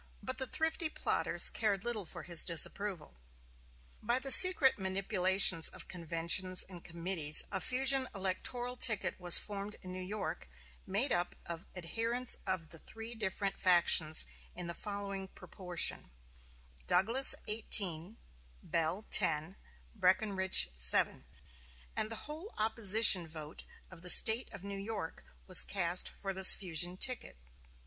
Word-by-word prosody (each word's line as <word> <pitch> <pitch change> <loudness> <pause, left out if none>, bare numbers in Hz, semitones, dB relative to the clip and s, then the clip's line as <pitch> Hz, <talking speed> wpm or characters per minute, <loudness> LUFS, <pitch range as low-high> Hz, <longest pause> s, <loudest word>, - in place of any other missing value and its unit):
But 260 0 -5
the 265 - 0
thrifty 320 +2 -3
plotters - - +1
cared 205 -3 -2
little 220 -6 -5
for - - -10
his 170 -3 -1
disapproval. 170 - -1 0.9
By 235 +3 -1
the 270 +1 -4
secret 310 - +5
manipulations 190 -2 +1
of - - -12
conventions 170 +2 +1
and 180 -3 -12
committees 165 -3 -2
a - - -3
fusion 265 +1 +3
electoral 240 +6 -3
ticket 220 -6 -1
was 175 -1 +4
formed 205 0 -6
in 185 0 -10
New 185 - -8
York, 200 - -7 0.4
made 215 +9 +2
up 175 0 -3
of 170 0 -9
adherents 230 +8 -3
of 185 -4 -5
the 165 - -10
three 225 +6 -10
different 200 -2 -5
factions 170 -3 +3 0.3
in 180 - -4
the 170 - -6
following 200 -1 -7
proportion: 180 - -3 0.8
Douglas, 225 +10 +1
eighteen; 200 -3 0 0.5
Bell, 170 +5 -4
ten; 155 +4 +1 0.4
Breckinridge, 190 - +1
seven; - - +2 0.7
and 215 - -1
the 225 - -4
whole 315 +8 -10
opposition 215 -4 +3
vote 155 -1 -10 0.3
of 175 -3 -15
the 180 - -5
State 225 +7 +4
of 200 -3 -12
New 200 0 -8
York 200 -5 -7 0.2
was 185 - +5
cast 180 -2 +1
for 195 -1 -7
this 190 0 +11
fusion 175 -1 0
ticket. 250 - +1
190 Hz, 135 wpm, -31 LUFS, 175-220 Hz, 0.9 s, this